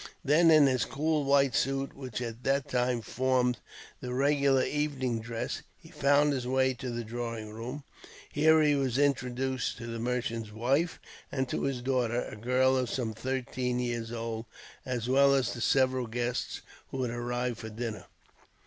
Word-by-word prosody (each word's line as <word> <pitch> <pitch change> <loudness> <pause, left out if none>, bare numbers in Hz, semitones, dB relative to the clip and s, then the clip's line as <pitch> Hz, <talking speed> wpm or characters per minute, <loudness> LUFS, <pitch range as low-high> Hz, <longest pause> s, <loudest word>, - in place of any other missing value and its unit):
Then 160 +4 +5
in 155 -2 +7
his 130 -3 +2
cool 155 +1 0
white 140 -2 +4
suit, 135 +1 0
which 130 -4 -5
at 115 0 -6
that 135 0 +1
time 125 -1 0
formed 125 0 +1 0.4
the 125 - -5
regular 140 -1 +3
evening 135 -5 -1
dress, 115 0 -4 0.2
he - - -16
found 145 +1 +3
his 125 -2 -3
way 130 0 +2
to 125 +1 -6
the 120 0 -3
drawing 115 -1 -5
room. 125 +6 -6 0.5
Here 155 +1 +5
he 150 -1 +4
was 135 -3 0
introduced 130 -2 0
to 115 - -7
the 115 -1 -5
merchant's 115 -2 -2
wife, 135 +10 0 0.3
and 130 -2 -1
to - - -2
his 130 -3 -2
daughter, 125 -2 +1
a - - -8
girl 125 +4 +2
of 125 -2 0
some 115 -4 -2
thirteen 125 +1 -2
years 120 -2 -2
old, 115 -1 -4 0.4
as 120 -2 -2
well 140 +2 +5
as 135 -2 +1
to 120 - -6
several 130 -1 +2
guests 120 +2 -2 0.3
who 130 -1 -3
had 120 - -2
arrived 120 0 -2
for 110 - -6
dinner. 110 0 -5
125 Hz, 170 wpm, -30 LUFS, 120-135 Hz, 0.5 s, in